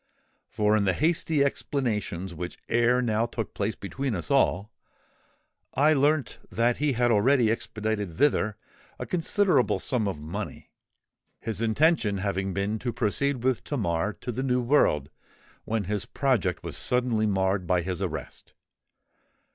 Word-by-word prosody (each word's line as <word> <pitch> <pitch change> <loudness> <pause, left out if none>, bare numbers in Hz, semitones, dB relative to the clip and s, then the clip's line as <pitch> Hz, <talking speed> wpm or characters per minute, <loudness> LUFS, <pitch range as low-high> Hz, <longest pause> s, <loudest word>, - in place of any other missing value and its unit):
For 105 -1 +2
in 105 -2 +2
the 95 - +2
hasty 155 - +1
explanations 105 -10 -2
which 85 +1 -6
ere 120 +2 +3
now 115 0 +1
took 115 -1 -5
place 105 +1 -2
between 130 +4 -3
us 85 -5 -4
all, 100 +5 +2 1.0
I 150 +3 +5
learnt 145 -3 +1
that 120 +1 +1
he 150 -1 +1
had 120 0 +2
already 115 +1 +4
expedited 105 -6 -3
thither 110 -7 +2 0.4
a - - -5
considerable 185 +3 +2
sum 120 -6 -1
of 95 -6 -3
money, 90 +8 -6 0.7
his 110 -2 -3
intention 115 -2 +2
having 95 0 -2
been 100 +4 -2
to 120 +1 -2
proceed 120 +3 -1
with 130 -3 +1
Tamar 105 - -1
to 125 - -3
the 125 +3 -3
New 125 -2 +1
World 80 - +2 0.5
when 110 -1 -1
his 105 +1 -3
project 120 - 0
was - - -5
suddenly 120 -3 +1
marred 95 -2 0
by 90 -1 +2
his 90 +1 -4
arrest. 80 -8 -6
110 Hz, 145 wpm, -27 LUFS, 100-130 Hz, 1.0 s, I